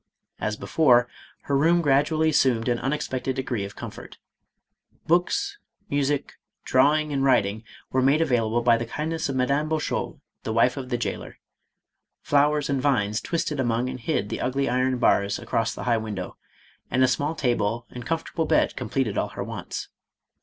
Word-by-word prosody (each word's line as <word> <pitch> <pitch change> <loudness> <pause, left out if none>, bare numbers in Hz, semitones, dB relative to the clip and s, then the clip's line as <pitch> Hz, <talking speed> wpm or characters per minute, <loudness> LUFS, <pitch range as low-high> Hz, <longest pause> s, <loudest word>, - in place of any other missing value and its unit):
As 105 +1 -2
before, 125 -6 +3 0.4
her 140 - -1
room 165 +5 +4
gradually 150 +3 +3
assumed 130 -6 +2
an 120 -1 +1
unexpected 135 -2 -2
degree 125 -5 -2
of 100 - -9
comfort. - - -9 0.9
Books, 400 - +1 0.3
music, 145 0 -1 0.2
draw 135 +4 +4
ing, 155 -1 -1
and 135 -1 0
writing 110 -5 +2 0.3
were 130 - +2
made 135 +4 +4
available 120 -6 +1
by 115 -1 +5
the 115 0 -4
kindness 160 +4 -3
of 135 - -2
Madame 140 +4 +1
Bouchaud, 160 -1 -2 0.2
the 110 - -3
wife 120 +2 +3
of 130 -2 -6
the 120 - 0
jailer; 120 - -5 0.9
flowers, 145 0 +2
and 140 -2 0
vines 110 -6 +1
twined 160 -4 -2
among 120 0 0
and 130 - -7
hid 115 -6 -1
the - - -4
ugly 135 +2 0
iron 130 +1 +1
bars 100 -4 +2
across 115 -1 -1
the - - -6
high 120 -2 +2
window, 105 -5 -5 0.5
and 130 - +2
a - - +6
small 145 +5 0
table 120 -4 0
and 125 - -7
comfort 165 +5 -3
able 165 - 0
bed - - +2
completed 130 -7 -1
all - - -1
her - - -5
wants. - - -6
130 Hz, 170 wpm, -25 LUFS, 120-150 Hz, 0.9 s, a